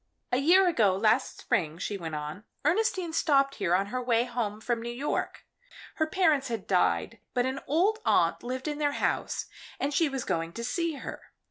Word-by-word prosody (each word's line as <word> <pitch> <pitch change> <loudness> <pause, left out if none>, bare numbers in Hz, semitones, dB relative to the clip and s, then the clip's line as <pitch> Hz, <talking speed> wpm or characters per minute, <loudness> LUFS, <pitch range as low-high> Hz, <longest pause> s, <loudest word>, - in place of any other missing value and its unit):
"A 250 - +3
year 355 +8 +5
ago 215 - +3
last 215 +2 +1
spring," 160 -3 0
she 200 +3 -3
went 165 -5 -5
on, 150 +6 -5 0.2
"Ernestine 365 -1 +1
stopped 275 -4 +3
here 175 0 +3
on 195 +2 +2
her 255 - -1
way 235 -1 +2
home 235 -4 -3
from 235 +1 -1
New 235 - -5
York. 255 +5 -3 0.5
Her 315 - +2
parents 315 -6 +2
had 230 -5 -4
died, 185 -2 +1 0.2
but 245 0 +2
an 260 +1 -2
old 375 +10 +2
aunt - - +2
lived 255 +3 -4
in 295 0 -3
their 290 -1 +1
house, - - -1 0.3
and 285 +1 -1
she 320 0 +3
was 270 -3 -3
going 165 0 -2
to 235 - -5
see 335 +6 -1
her. 275 - -9
255 Hz, 195 wpm, -28 LUFS, 210-305 Hz, 0.5 s, year